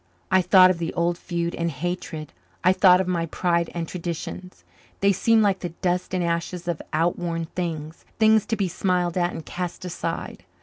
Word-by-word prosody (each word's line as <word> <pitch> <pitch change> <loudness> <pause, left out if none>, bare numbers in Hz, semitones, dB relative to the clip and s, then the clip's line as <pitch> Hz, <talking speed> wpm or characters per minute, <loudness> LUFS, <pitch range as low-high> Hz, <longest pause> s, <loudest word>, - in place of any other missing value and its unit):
I 190 - +5
thought 185 0 +7
of 175 - -3
the 165 -1 -2
old 170 0 +1
feud 170 -1 -3
and 170 0 -1
hatred; 160 - -5 0.3
I 185 - +5
thought 185 -1 +6
of 190 - -1
my 170 -2 0
pride 170 0 0
and 165 -1 -3
traditions. 180 +1 -6 0.4
They 200 0 +4
seemed 220 +3 +3
like 195 -2 +2
the 175 - -4
dust 180 +1 0
and 180 - 0
ashes 170 +1 -2
of 170 -3 -2
outworn 165 +1 0
things 160 -3 -4
things 220 -1 +4
to 225 - 0
be 200 -3 0
smiled 180 -1 0
at 175 -1 +1
and 160 - -7
cast 180 0 -5
aside. 180 -1 -4
175 Hz, 185 wpm, -24 LUFS, 170-185 Hz, 0.4 s, thought